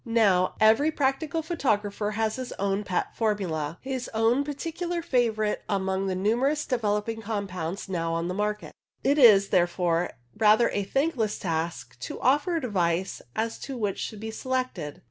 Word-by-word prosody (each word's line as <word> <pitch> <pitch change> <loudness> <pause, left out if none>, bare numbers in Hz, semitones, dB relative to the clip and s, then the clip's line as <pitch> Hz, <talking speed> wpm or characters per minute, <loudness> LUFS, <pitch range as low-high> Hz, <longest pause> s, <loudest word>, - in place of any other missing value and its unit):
Now, 210 -6 +3
every 220 +8 +5
practical 295 +3 0
photographer 215 - -1
has 220 0 0
his 255 -1 -5
own 200 +1 -1
pet 185 -3 -2
formula, 175 -8 -1
his 260 -2 -4
own 230 +5 +3
particular 335 +4 -4
favourite 225 -7 +1
among 190 -1 0
the 185 - -1
numerous 240 +10 +1
developing 225 -2 -1
compounds 200 -5 -4
now 165 -3 -1
on 165 +1 -1
the 180 - -2
market. 210 +2 -2 0.3
It 285 +2 +3
is, 205 -6 +7
therefore, 175 -1 +2 0.3
rather 220 +2 +4
a 200 -1 -1
thankless 260 -3 0
task 160 -7 -3
to - - -6
offer 290 +7 +2
advice 190 - 0
as 225 +1 -2
to 270 -2 -6
which 205 -4 -2
should 215 - -5
be 220 0 -4
selected. 255 - -3
215 Hz, 150 wpm, -27 LUFS, 190-255 Hz, 0.3 s, is